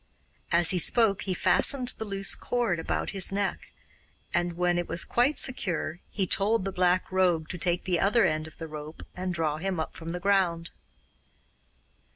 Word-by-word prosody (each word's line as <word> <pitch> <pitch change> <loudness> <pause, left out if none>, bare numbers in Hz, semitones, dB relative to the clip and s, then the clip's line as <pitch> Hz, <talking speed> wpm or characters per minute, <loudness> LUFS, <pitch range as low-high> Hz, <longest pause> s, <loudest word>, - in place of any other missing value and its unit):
As 170 +1 +4
he 185 - +1
spoke 215 +1 +2
he 185 -2 -2
fastened 255 +6 +3
the 220 - -3
loose 195 -1 -1
cord 235 -9 -1
about - - -3
his 195 -2 +4
neck, 200 0 -3 0.6
and 175 0 0
when 175 0 0
it 175 - -3
was 170 - +1
quite 250 +5 +1
secure 175 -9 -1
he 195 - -2
told 200 +2 +1
the 195 - -2
Black 180 0 +1
Rogue 180 -4 +1
to 180 - -5
take 175 +1 0
the 180 -3 0
other 210 +2 +3
end 155 -2 -1
of 160 - -15
the 165 - -7
rope 155 +1 -9
and 185 0 -3
draw 160 -3 -1
him 185 +1 -3
up 160 - -4
from 165 0 -7
the 180 - -4
ground. 175 -3 0
180 Hz, 185 wpm, -27 LUFS, 170-195 Hz, 0.6 s, As